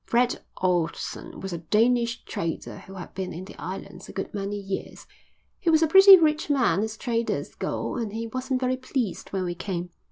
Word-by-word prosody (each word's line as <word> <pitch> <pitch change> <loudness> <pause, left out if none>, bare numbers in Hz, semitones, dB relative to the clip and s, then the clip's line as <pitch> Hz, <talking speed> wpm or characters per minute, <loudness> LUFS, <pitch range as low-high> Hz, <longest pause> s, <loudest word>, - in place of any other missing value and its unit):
"Fred 245 +1 +1 0.2
Ohlson 175 -3 -1
was 190 -1 -4
a 170 - -3
Danish 230 +7 +2
trader 165 -1 -4
who 195 - -12
had 180 - -8
been 190 -1 -4
in 180 +3 -7
the - - -11
islands 190 0 -7
a - - -6
good 195 - -5
many 200 0 -3
years. 195 -1 -5 0.5
He 350 - +1
was 320 0 +5
a - - +4
pretty 385 +3 +10
rich 310 -2 +2
man 260 -8 +3
as 220 0 -3
traders 235 -1 -2
go - - -3
and 225 -4 -2
he 225 +2 -4
wasn't 255 +3 -2
very 255 0 +1
pleased 255 -5 -3
when 190 -1 -2
we 175 - -2
came. 180 -1 -4
220 Hz, 195 wpm, -26 LUFS, 190-255 Hz, 0.5 s, pretty